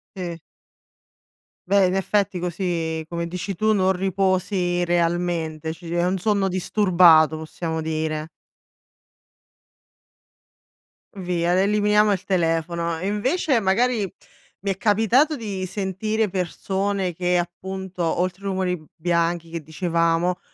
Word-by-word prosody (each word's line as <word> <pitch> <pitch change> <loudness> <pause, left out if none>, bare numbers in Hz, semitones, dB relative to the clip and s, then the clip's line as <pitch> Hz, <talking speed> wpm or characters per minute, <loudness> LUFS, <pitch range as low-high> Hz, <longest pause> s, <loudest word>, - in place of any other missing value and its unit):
Sì. 175 -3 -5 1.3
Beh 195 0 +4
in 185 - +1
effetti 195 0 0
così 170 -2 -2
come 170 0 -3
dici 180 +3 -4
tu, 215 +4 +2
non 190 -2 +3
riposi 185 -1 0
realmente 170 -2 -1
ci 165 0 -8
è 175 0 +1
un 185 +2 0
sonno 200 0 +1
disturbato, 175 -4 +4
possiamo 160 +1 -4
dire. 155 -1 -2 2.9
Via 175 -2 0
l - - +3
eliminiamo 210 +1 +3
il 190 -2 -1
telefono. 170 -2 0
E 180 - -5
invece, 255 - +1
magari, 215 0 +1 0.5
mi 200 -1 -1
è 185 - -4
capitato 225 +9 +3
di 200 -6 -4
sentire 210 +3 -1
persone 190 +1 -2
che 180 +1 +1
appunto 185 +1 -4
oltre 180 +3 -1
i - - -1
rumori 185 -2 0
b 155 - -17
bianchi 170 0 0
che 165 -1 -4
dicevamo, 170 +2 0
180 Hz, 120 wpm, -23 LUFS, 170-195 Hz, 2.9 s, Beh